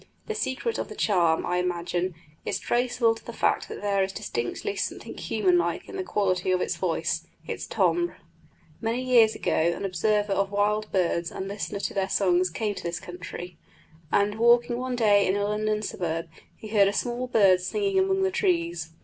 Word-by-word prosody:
The 440 - -3
secret 430 - -2
of - - -3
the - - -8
charm, 175 -6 +2
I 180 - 0
imagine, 180 0 -1 0.3
is - - -1
traceable 240 -1 +1
to 225 - -13
the - - -7
fact - - 0
that - - -7
there 200 -1 +2
is 190 0 0
distinctly 410 - -3
something - - -4
human 360 -2 +2
like - - -2
in - - -8
the 380 - -2
quality 185 - 0
of 185 - +2
the - - +1
voice, - - -1 0.2
its - - -4
timbre. 345 0 +1 0.6
Many 230 +2 -1
years 235 -4 +5
ago - - -2
an 170 +4 +1
observer 205 +1 +1
of 195 0 +1
wild 210 +1 0
birds 170 -2 +1
and 190 - -5
listener 200 0 -4
to - - -2
their 195 -1 -1
songs 185 -2 +2
came 210 +5 -2
to - - -8
this 170 0 -3
country, 180 0 -8 0.5
and 205 +2 +2
walking 240 +1 +4
one 255 0 -2
day 205 -4 +4
in 190 - +2
a 205 - 0
London 210 +1 0
suburb 165 -4 -3 0.3
he 215 - -9
heard 205 -2 +5
a 200 - 0
small 245 +3 -2
bird 195 -6 +5
singing 395 - 0
among 385 0 +2
the 380 - +2
trees. 170 - 0
205 Hz, 190 wpm, -26 LUFS, 180-240 Hz, 0.6 s, years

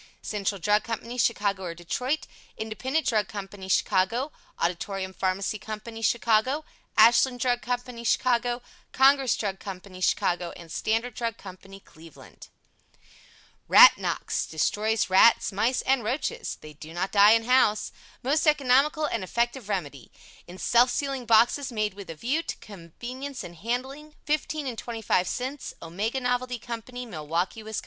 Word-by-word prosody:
CENTRAL 200 -1 -2
DRUG 210 +4 +2
COMPANY, 230 +2 -5
Chicago 205 -5 +1
or 170 -2 -5
Detroit 250 - -2 0.3
INDEPENDENT 260 +8 -2
DRUG 215 -7 +1
COMPANY, 195 -2 -8
Chicago 210 +10 +1 0.3
AUDITORIUM 190 +2 -2
PHARMACY 190 +3 -1
COMPANY, 220 +2 -7
Chicago 235 +6 +2 0.3
ASHLAND 245 +2 +5
DRUG 245 0 +1
COMPANY, 245 -1 -4
Chicago 245 0 +1 0.3
CONGRESS 270 -1 +4
DRUG 195 -3 -3
COMPANY, 185 -1 -9
Chicago 175 -1 0
STANDARD 225 +8 -1
DRUG 230 0 -3
COMPANY, 195 +1 -12
Cleveland 160 -1 -15 1.2
RAT - - +9
NOX - - -2
Destroys 210 +6 0
Rats, 205 +5 +5
Mice 225 +6 0
and 265 -2 +2
Roaches 250 +7 -2
(Do 155 +1 -12
not 185 +2 -2
die 205 +1 +7
in 225 0 +3
house) 225 -4 +3 0.3
Most 295 +5 +1
economical 295 +1 +3
and 230 -8 -2
effective 235 +3 -2
remedy. 145 - -4 0.4
In 180 +1 -10
self 240 +5 +4
sealing 270 -2 -3
boxes 240 +5 +4
made 215 -3 -1
with 200 0 -10
a 165 - -6
view 260 - -1
to - - -6
convenience 240 - -8
in 175 - -9
handling, 260 - -5
15 305 0 -1
and 245 -4 -4
25 225 -6 -1
cents. 260 +3 -4
OMEGA 205 +10 -3
NOVELTY 250 0 -1
COMPANY, 240 +1 -7
Milwaukee, 170 +2 -3
Wis. 220 0 -4
225 Hz, 140 wpm, -26 LUFS, 195-250 Hz, 1.2 s, RAT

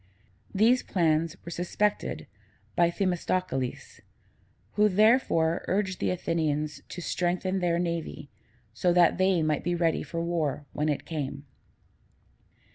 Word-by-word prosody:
These 230 +6 +4
plans 165 -1 +1
were 170 - -6
suspected 190 +5 -1 0.5
by 170 -1 +4
Themistocles, 180 -7 -2 0.7
who 210 +1 +3
therefore 195 -6 +3
urged 190 -1 0
the - - 0
Athenians 155 -4 -1
to 175 - -6
strengthen 185 +2 -1
their 175 -2 +1
navy, 170 -4 -3 0.4
so 175 +10 +1
that 175 +1 +4
they 185 -3 +3
might 155 -2 0
be 175 +1 0
ready 165 -2 +1
for 165 - -5
war 155 -4 -1
when 150 +1 0
it 145 - -2
came. 140 -3 -5
170 Hz, 120 wpm, -28 LUFS, 155-185 Hz, 0.7 s, These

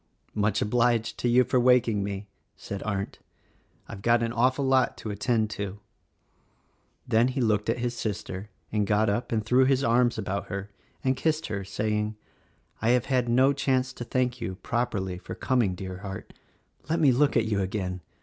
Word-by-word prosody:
"Much 105 0 +1
obliged 120 +1 +1
to 120 - +1
you 125 +2 +5
for 125 +1 +1
waking 120 -4 +4
me," 100 0 -4 0.3
said 100 -1 -6
Arndt. 100 -2 -3 0.7
"I've 100 - -8
got 120 +2 +3
an 115 0 -1
awful 130 +3 +2
lot 130 -1 +2
to 110 - -5
attend 110 +1 0
to." 100 -2 -4 1.3
Then 115 +2 +4
he 130 +1 -2
looked 110 -4 +1
at - - +1
his 120 0 -2
sister 105 -2 -4 0.2
and 105 -2 0
got 105 0 +3
up 120 +4 -2
and 110 -2 0
threw 125 +3 +4
his 135 0 +2
arms 120 0 +3
about 100 -2 -3
her 100 0 -5 0.3
and 130 0 +2
kissed 155 +4 0
her, 100 -2 -3
saying, 105 +2 -1 0.7
"I 115 - +2
have 120 - -3
had 125 -2 +2
no 130 +4 +4
chance 130 -2 0
to - - -6
thank 125 0 -1
you, 95 -5 -3
properly, 100 -7 -1
for - - -7
coming, 120 -8 +1
dear 95 0 -6
heart. 95 -1 -7 0.6
Let 165 +1 +1
me 145 -5 +5
look 140 +2 +3
at 115 - +3
you 105 -2 0
again! 95 -2 -3
115 Hz, 180 wpm, -27 LUFS, 100-125 Hz, 1.3 s, you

